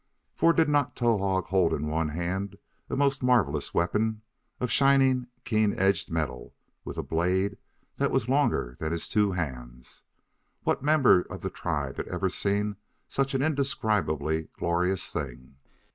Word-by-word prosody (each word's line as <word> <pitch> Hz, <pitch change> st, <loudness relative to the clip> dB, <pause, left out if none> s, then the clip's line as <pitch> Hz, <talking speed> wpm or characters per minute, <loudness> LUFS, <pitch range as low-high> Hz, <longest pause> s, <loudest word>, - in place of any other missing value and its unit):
For 165 Hz, -, +4 dB
did 160 Hz, -1 st, +3 dB
not 145 Hz, -2 st, +1 dB
Towahg 100 Hz, -6 st, +1 dB
hold 95 Hz, -3 st, +3 dB
in 75 Hz, +1 st, -3 dB
one 80 Hz, 0 st, 0 dB
hand 90 Hz, +5 st, -3 dB, 0.3 s
a -, -, -2 dB
most 140 Hz, 0 st, +1 dB
marvelous 120 Hz, -, +2 dB
weapon 105 Hz, +5 st, 0 dB, 0.4 s
of 125 Hz, -, -2 dB
shining, 135 Hz, -2 st, +4 dB, 0.2 s
keen 110 Hz, -3 st, +1 dB
edged 95 Hz, -1 st, +2 dB
metal, 80 Hz, -4 st, -3 dB, 0.3 s
with -, -, -7 dB
a -, -, -2 dB
blade 95 Hz, +4 st, 0 dB, 0.4 s
that -, -, +1 dB
was 110 Hz, -, 0 dB
longer 130 Hz, -, +1 dB
than 80 Hz, 0 st, -2 dB
his 85 Hz, -1 st, -3 dB
two 105 Hz, -2 st, +2 dB
hands? 60 Hz, -7 st, -6 dB, 0.6 s
What -, -, 0 dB
member 140 Hz, -9 st, +5 dB
of -, -, -9 dB
the -, -, -3 dB
tribe -, -, -3 dB
had -, -, -4 dB
ever 95 Hz, +1 st, -1 dB
seen 100 Hz, +2 st, -1 dB, 0.3 s
such 135 Hz, 0 st, -1 dB
an 135 Hz, -, +1 dB
indescribably 100 Hz, -, 0 dB
glorious 90 Hz, +2 st, 0 dB
thing? 65 Hz, -2 st, -6 dB
95 Hz, 150 wpm, -27 LUFS, 80-125 Hz, 0.6 s, member